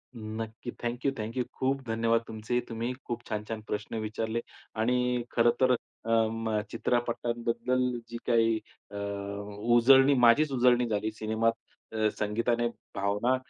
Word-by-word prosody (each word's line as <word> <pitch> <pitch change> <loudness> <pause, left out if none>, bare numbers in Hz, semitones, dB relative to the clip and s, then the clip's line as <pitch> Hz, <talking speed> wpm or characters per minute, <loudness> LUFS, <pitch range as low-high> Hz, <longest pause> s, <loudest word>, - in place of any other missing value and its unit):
नक्की. 110 +1 -6
Thank 120 +1 -3
you, 140 - +4
thank 110 +3 -5
you. 125 - +2
खूप 135 +1 0
धन्यवाद 115 0 +2
तुमचे 110 +2 -2
तुम्ही 115 +1 -2
खूप 120 0 -4
छान-छान 110 0 -3
प्रश्न 105 +2 -4
विचारले 110 +1 -2 0.4
आणि 125 +1 +1
खरंतर 120 +2 +4 0.3
अ, - - -4 0.2
म, 110 -1 -1
चित्रपटांबद्दल 120 +1 0 0.3
जी 120 - -5
काही 115 -1 +3 0.3
अ, - - -9 0.8
उजळणी 135 +3 +7
माझीच 140 +6 +5
उजळणी 125 -1 +4
झाली 110 0 -1
सिनेमात 110 +1 +1 0.7
संगीताने, 115 +3 +1 0.3
भावना 100 +6 +1
115 Hz, 125 wpm, -29 LUFS, 110-120 Hz, 0.8 s, उजळणी